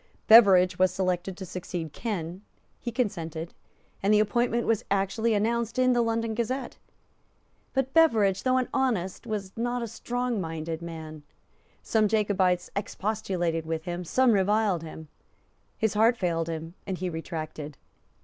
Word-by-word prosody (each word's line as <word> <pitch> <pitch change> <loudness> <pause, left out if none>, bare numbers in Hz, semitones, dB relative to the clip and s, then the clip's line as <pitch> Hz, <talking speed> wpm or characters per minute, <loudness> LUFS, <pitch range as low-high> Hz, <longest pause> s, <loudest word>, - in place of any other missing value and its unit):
Beveridge 190 -5 +7
was 185 -1 +4
selected 185 0 -2
to 190 - -6
succeed 175 -3 -5
Ken; 185 -5 -4 0.4
he 240 - -4
consented; 170 -9 -3 0.5
and 200 - +2
the 210 - +5
appointment 235 +3 +1
was 225 -2 +1
actually 200 +3 +1
announced 230 +2 0
in 255 0 +4
the 240 - +3
London 230 -1 0
Gazette. 245 +3 -3 1.0
But 265 0 0
Beveridge, 220 - +4
though 255 0 +2
an 255 - +1
honest, 225 -6 -1
was 205 -4 -4
not 240 +1 -1
a - - -1
strongminded 190 -9 -3
man. 160 -2 -8 0.6
Some 220 -1 +2
Jacobites 195 -4 +1
expostulated 190 -5 -2
with 160 -1 -2
him; 175 +1 -4
some 255 +8 +3
reviled 205 -2 +2
him; 160 -1 -9 0.7
his 220 -3 +1
heart 225 +3 +4
failed 165 -4 -1
him; 165 0 -5
and 190 - -2
he 185 - -3
retracted. 155 -3 -6
195 Hz, 140 wpm, -27 LUFS, 170-230 Hz, 1.0 s, Beveridge